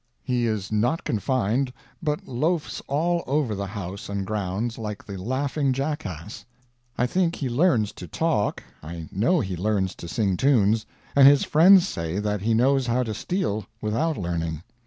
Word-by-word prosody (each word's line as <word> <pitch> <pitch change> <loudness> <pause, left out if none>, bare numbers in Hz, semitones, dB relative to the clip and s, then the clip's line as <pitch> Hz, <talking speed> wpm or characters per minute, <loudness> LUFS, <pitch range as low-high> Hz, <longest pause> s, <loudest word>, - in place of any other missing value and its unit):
He 125 -3 0
is 105 -3 -2
not 120 +10 +1
confined, 125 +3 0 0.3
but 150 -3 -2
loafs 155 +6 -1
all 170 +5 +1
over 140 -5 +1
the 100 0 -3
house 100 -1 -6
and 100 -1 -2
grounds, 105 +3 -2
like 105 -2 -5
the 100 - -7
laughing 135 +7 -1
jackass. 110 - -4 0.5
I 125 - +2
think 170 +5 +1
he 140 - -3
learns 120 - +2
to 90 - -10
talk, 155 - 0 0.2
I 80 +1 -7
know 160 - +2
he 95 -5 -3
learns 95 0 0
to 85 - -8
sing 100 -2 0
tunes, 110 -5 +3 0.3
and 140 -1 +8
his 140 -1 +6
friends 180 +4 +6
say 85 - -3
that 105 -1 -1
he 110 +2 +2
knows 130 +2 +3
how 125 +2 +2
to 110 -3 -3
steal 110 - -2
without 140 +10 0
learning. 85 -3 -3
115 Hz, 165 wpm, -25 LUFS, 100-140 Hz, 0.5 s, and